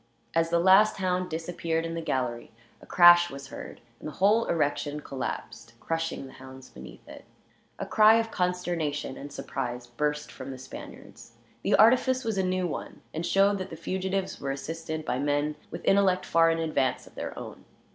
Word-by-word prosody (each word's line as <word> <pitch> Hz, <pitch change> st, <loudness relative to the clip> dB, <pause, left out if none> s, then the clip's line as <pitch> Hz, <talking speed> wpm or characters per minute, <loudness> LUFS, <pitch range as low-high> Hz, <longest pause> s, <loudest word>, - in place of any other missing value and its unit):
As 165 Hz, 0 st, +2 dB
the 170 Hz, -, +2 dB
last 190 Hz, +5 st, +5 dB
hound 185 Hz, -1 st, -1 dB
disappeared 165 Hz, 0 st, -2 dB
in 165 Hz, -, -4 dB
the 165 Hz, -, -3 dB
gallery, 125 Hz, -6 st, -2 dB, 0.3 s
a -, -, -15 dB
crash 175 Hz, 0 st, +7 dB
was 140 Hz, -2 st, -9 dB
heard, -, -, -9 dB, 0.2 s
and -, -, -7 dB
the 155 Hz, -, -7 dB
whole 210 Hz, +7 st, +3 dB
erection 150 Hz, -2 st, -1 dB
collapsed, 115 Hz, -4 st, -6 dB
crushing 165 Hz, -3 st, -3 dB
the 130 Hz, -, -12 dB
hounds 130 Hz, 0 st, -13 dB
beneath 65 Hz, +1 st, -13 dB
it. -, -, -11 dB, 0.5 s
A -, -, -4 dB
cry 215 Hz, 0 st, +6 dB
of 225 Hz, 0 st, 0 dB
consternation 175 Hz, -6 st, -2 dB
and 145 Hz, +1 st, -9 dB
surprise 125 Hz, -2 st, -5 dB
burst 150 Hz, +4 st, -3 dB
from 130 Hz, -, -9 dB
the 130 Hz, -, -6 dB
Spaniards. 130 Hz, -, -11 dB, 0.3 s
The -, -, +2 dB
artifice 255 Hz, +4 st, +4 dB
was 220 Hz, -4 st, -1 dB
a -, -, +2 dB
new 185 Hz, 0 st, 0 dB
one, 170 Hz, -, -6 dB
and 160 Hz, -, -3 dB
showed 195 Hz, +3 st, +3 dB
that 185 Hz, -, -5 dB
the -, -, -7 dB
fugitives 190 Hz, +3 st, -3 dB
were 140 Hz, -, -3 dB
assisted 155 Hz, +3 st, -5 dB
by 125 Hz, -, -1 dB
men 145 Hz, +1 st, 0 dB
with -, -, -8 dB
intellect 195 Hz, -2 st, +3 dB
far 165 Hz, 0 st, +4 dB
in 165 Hz, -, +1 dB
advance 155 Hz, -5 st, -1 dB
of -, -, -17 dB
their -, -, -6 dB
own. -, -, -9 dB
165 Hz, 185 wpm, -27 LUFS, 145-185 Hz, 0.5 s, crash